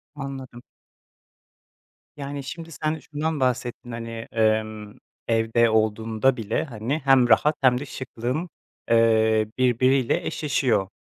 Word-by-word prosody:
Anladım. 135 -4 -7 1.5
Yani, 140 0 -5
şimdi, 165 +4 -8
sen 155 +2 -2
şundan 155 +1 -3
bahsettin. 125 -1 -2
Hani, 115 0 -6 0.2
emm, 110 -1 0 0.3
evde 115 0 +2
olduğunda 110 +3 +1
bile, 110 0 -1
hani, 125 +2 -3
hem 130 -3 +5
rahat 150 +7 +4
hem 125 -2 +4
de 145 - -6
şıklığın, 130 +5 -4 0.4
eee, 110 -1 +4
birbiriyle 130 0 +2
eşleşiyor. 130 -9 0
125 Hz, 110 wpm, -24 LUFS, 110-140 Hz, 1.5 s, hem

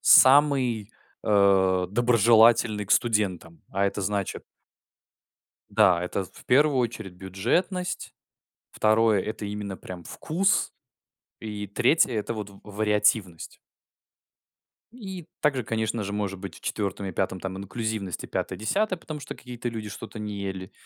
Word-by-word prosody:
самый, 130 -6 +5 0.3
а, 95 -3 +3
доброжелательный 115 -1 +4
к - - -15
студентам. 95 -7 +1
А 100 +1 0
это 100 +1 -2
значит 100 0 -2 1.3
да, 90 -1 +4
это 95 +2 -2
в - - -17
1 140 +2 +4
очередь 115 -6 -2
бюджетность, 125 - -2 0.6
второе- 110 -1 +3
это 110 0 -5
именно, 100 -2 -5
прям 90 -2 -9
вкус, 190 +5 0 0.7
и 105 -2 -5
третье- 125 - +3
это 110 +1 -2
вот 105 -2 -6
в 100 - -16
вариативность. 105 -3 0 1.4
И 190 -8 -8 0.2
также, 140 -4 +1
конечно 110 0 -2
же, 100 - -4
может 100 -2 -2
быть, 100 0 -7
в - - -15
четвертом 100 -1 -3
и - - -4
пятом 95 -1 -2
там 95 0 -5
инклюзивность, 105 -2 -4
и - - -7
пятое-десятое, 185 - -1
потому 155 -2 -7
что - - -7
какие-то 125 -1 -7
люди 110 -3 -5
что-то 110 +2 -8
не 105 -1 -5
ели. 95 -1 -5
105 Hz, 130 wpm, -26 LUFS, 100-120 Hz, 1.4 s, самый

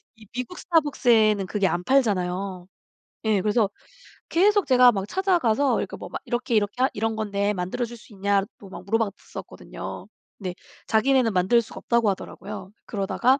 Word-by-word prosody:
이 220 -1 -16
미국 250 +8 -5
스타벅스에는 235 - +3
그게 200 -2 +1
안 175 +1 -1
팔잖아요. 190 -7 0 0.6
예 215 -3 +2
그래서 210 -1 +2 0.6
계속 405 +3 +4
제가 250 -2 +7
막 195 -1 -3
찾아가서 315 - +2
그러니까 - - -3
뭐 - - -8
막 - - -5
이렇게, 240 -1 -1
이렇게 205 +4 0
하 265 - +4
이런 225 +1 -1
건데 205 -1 0
만들어줄 230 +6 -3
수 220 - -18
있냐고 200 0 -1
막 190 - -9
물어봤었거든요. 220 -1 -4 0.3
근데 180 -2 -4 0.3
자기네는 240 +1 +3
만들 190 +6 +4
수가 225 - -12
없다고 235 -3 +2
하더라고요. 195 +1 -7
그러다가 235 +6 +1
215 Hz, 375 characters per minute, -25 LUFS, 195-250 Hz, 0.6 s, 제가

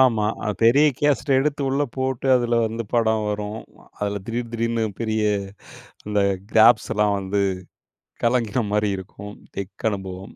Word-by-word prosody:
ஆமா. 115 -5 +4 0.2
அது 105 - -1
பெரிய 130 +7 +6
கேஸட்டை 145 -1 +1
எடுத்து 145 0 -1
உள்ள 135 +2 +1
போட்டு 130 0 -2
அதில 120 -1 +2
வந்து 115 +1 -4
படம் 110 -2 +2
வரும். 105 0 -3 0.4
அதில 100 0 -2
திடீர் 115 0 -3
திடீர்னு 115 0 0 0.2
பெரிய 110 -1 0 0.9
அந்த 105 -1 +1 0.3
கிராப்ஸ் 110 0 +5
எல்லாம் 105 -1 +2
வந்து 100 +1 -1 0.8
கலங்கின 120 -1 +1
மாரி 105 -1 +1
இருக்கும், 100 +2 -9 0.2
டெக் 100 +3 -4
அனுபவம். 95 -1 -7
110 Hz, 140 wpm, -23 LUFS, 105-120 Hz, 0.9 s, பெரிய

